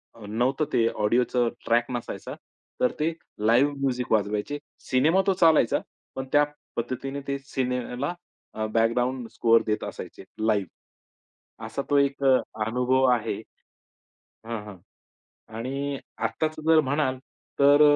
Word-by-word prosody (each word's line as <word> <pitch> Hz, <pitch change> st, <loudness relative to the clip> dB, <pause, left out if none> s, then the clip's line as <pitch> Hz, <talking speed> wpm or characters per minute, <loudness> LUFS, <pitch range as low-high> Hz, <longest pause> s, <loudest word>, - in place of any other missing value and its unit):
अ, 110 Hz, -, -11 dB
नव्हतं 125 Hz, +8 st, +1 dB
ते 115 Hz, -1 st, +4 dB, 0.2 s
ऑडिओचं 120 Hz, +2 st, +2 dB, 0.2 s
ट्रॅक 120 Hz, +1 st, +3 dB
नसायचा. 120 Hz, -2 st, -5 dB, 0.5 s
तर 125 Hz, -, +4 dB
ते 155 Hz, +2 st, +2 dB, 0.4 s
लाईव्ह 130 Hz, +6 st, +4 dB
म्युझिक 125 Hz, -2 st, -1 dB
वाजवायचे, 105 Hz, +6 st, 0 dB, 0.3 s
सिनेमा 155 Hz, +9 st, +4 dB
तो 195 Hz, -, +5 dB
चालायचा. 160 Hz, -8 st, +5 dB, 0.4 s
पण 130 Hz, -, -3 dB
त्या 145 Hz, 0 st, +6 dB, 0.3 s
पद्धतीने 130 Hz, +4 st, -3 dB
ते 140 Hz, 0 st, -1 dB
सिनेमाला 130 Hz, +2 st, -2 dB, 0.4 s
अ, 110 Hz, 0 st, -2 dB
बॅकग्राऊंड 120 Hz, +2 st, +1 dB
स्कोर 115 Hz, -1 st, +4 dB
देत 105 Hz, -, 0 dB
असायचे, -, -, -7 dB, 0.2 s
लाईव्ह. 105 Hz, -4 st, -1 dB, 0.8 s
असा 115 Hz, +5 st, -3 dB
तो 145 Hz, -, +4 dB
एक 140 Hz, 0 st, +1 dB
अ, 135 Hz, -1 st, +6 dB, 0.3 s
अनुभव 125 Hz, +3 st, +2 dB
आहे. 115 Hz, -2 st, -1 dB, 1.1 s
हां, 115 Hz, -2 st, -3 dB
हां. 105 Hz, -, -9 dB, 0.8 s
आणि 140 Hz, +4 st, -3 dB, 0.3 s
आत्ताच 155 Hz, 0 st, -2 dB
जर 160 Hz, -1 st, +7 dB
म्हणाल 140 Hz, -2 st, +1 dB, 0.4 s
तर 145 Hz, +1 st, +6 dB
125 Hz, 125 wpm, -26 LUFS, 115-140 Hz, 1.1 s, जर